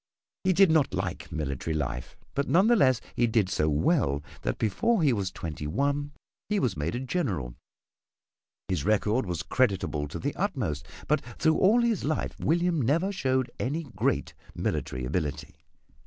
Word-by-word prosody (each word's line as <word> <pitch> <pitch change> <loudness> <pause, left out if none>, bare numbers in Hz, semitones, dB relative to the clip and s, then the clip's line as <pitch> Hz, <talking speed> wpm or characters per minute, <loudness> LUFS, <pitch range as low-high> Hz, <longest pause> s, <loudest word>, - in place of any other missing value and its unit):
He 185 - +3
did 190 -1 +5
not 145 -10 +3
like 90 -1 -4
military 75 0 -3
life, 60 -5 -3 0.2
but 140 0 -1
none 185 +4 +5
the 240 +1 +5
less 130 - +4
he 120 - +3
did 110 -4 +2
so 75 -5 +1
well 75 - +2 0.2
that - - -2
before 180 - +1
he 140 -4 +4
was 100 -4 -1
twenty 80 -4 -5
one 140 - 0 0.4
he 210 -1 +2
was 120 - 0
made 75 +6 -2
a - - -1
General. 120 - -2 1.1
His 90 -6 -1
record 105 +3 +1
was 85 -4 -2
creditable 95 - 0
to 70 - -6
the 145 - -2
utmost, 110 - -2 0.2
but 150 -1 +2 0.2
through 160 -1 +3
all 225 +5 +5
his 230 -4 +1
life 155 +2 -1
William 170 -1 +1
never 165 - +2
showed 130 -9 0
any 150 +6 -1
great - - 0 0.2
military 65 0 -2
ability. 75 +1 -3
125 Hz, 165 wpm, -28 LUFS, -, 1.1 s, did